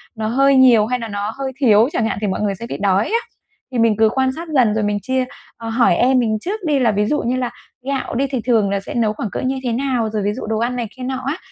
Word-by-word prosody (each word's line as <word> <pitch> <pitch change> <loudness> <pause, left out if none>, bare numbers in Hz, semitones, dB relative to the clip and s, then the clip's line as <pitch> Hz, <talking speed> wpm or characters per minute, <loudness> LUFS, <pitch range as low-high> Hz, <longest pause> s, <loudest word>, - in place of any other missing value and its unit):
nó 220 -1 -3
hơi 275 +4 +3
nhiều 245 -5 +6
hay 250 +2 -1
là 230 - -5
nó 205 +1 -3
hơi 270 -1 -3
thiếu 225 -3 +5
chẳng 235 - 0
hạn, 215 -3 -2
thì 210 - 0
mọi 190 - -2
người 205 -2 0
sẽ 230 - -7
bị - - -4
đói 195 +1 +2
á. 460 +2 +1 0.5
Thì 245 - -2
mình 225 -2 +3
cứ 220 0 +4
quan 260 +2 +1
sát 330 +5 -7
dần 235 -6 +4
rồi 220 -1 0
mình 205 0 0
chia, 260 +2 -1 0.3
à, 225 -1 -6
hỏi 235 +1 +3
em 255 +1 +3
mình 220 -3 +1
trước 415 - -3
đi 295 -3 +2
là 240 -4 +3
ví 205 0 +1
dụ 295 +7 0
như 245 +2 -1
là 250 -2 -1 0.4
gạo 275 -4 -2
đi, 275 +3 +1
thì 260 -3 -3
thường 220 -5 +2
là 200 - 0
sẽ 195 - -8
nấu 220 -3 +1
khoảng 215 0 -4
cỡ - - -3
như 265 0 -1
thế 245 - -1
nào? 245 -3 -1
Rồi 215 -2 -2
ví 205 +1 0
dụ 255 - -6
đồ 220 0 -1
ăn 240 +2 -1
này 240 -3 -3
kia 255 - -7
nọ 260 0 -3
á, 285 +6 -2
235 Hz, 300 wpm, -19 LUFS, 215-260 Hz, 0.5 s, nhiều